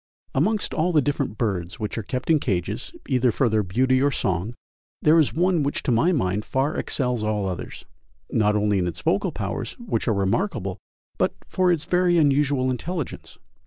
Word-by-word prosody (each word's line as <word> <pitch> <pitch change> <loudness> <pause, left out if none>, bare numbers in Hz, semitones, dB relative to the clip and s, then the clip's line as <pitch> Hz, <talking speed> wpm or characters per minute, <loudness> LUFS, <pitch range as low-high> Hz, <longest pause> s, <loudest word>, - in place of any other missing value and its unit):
Amongst 205 +10 +1
all 170 +3 +1
the 155 -3 +4
different 140 -5 -2
birds 95 -4 -2
which 105 -2 -3
are 115 - -2
kept 125 +8 -2
in 155 - +5
cages, 90 -10 -2 0.2
either 125 -1 +2
for 120 +2 +2
their 110 0 +2
beauty 130 +7 +2
or 140 - +4
song, 100 -3 -1 0.5
there 155 +2 +6
is 155 - +3
one 175 0 +2
which 140 0 -1
to - - 0
my 160 +10 +3
mind 105 - 0
far 135 +6 -1
excels 125 -4 -1
all 105 -2 0
others, 90 -2 -6 0.5
not 105 -1 +2
only 105 -1 +2
in 90 - 0
its 85 - -5
vocal - - +1
powers, - - -4
which 225 - -3
are 115 - +3
remarkable, 100 - -1 0.4
but - - +1
for 185 -1 +2
its 165 -3 0
very 180 0 +3
unusual 140 -3 +3
intelligence. 160 +5 -5
130 Hz, 185 wpm, -24 LUFS, 105-155 Hz, 0.5 s, there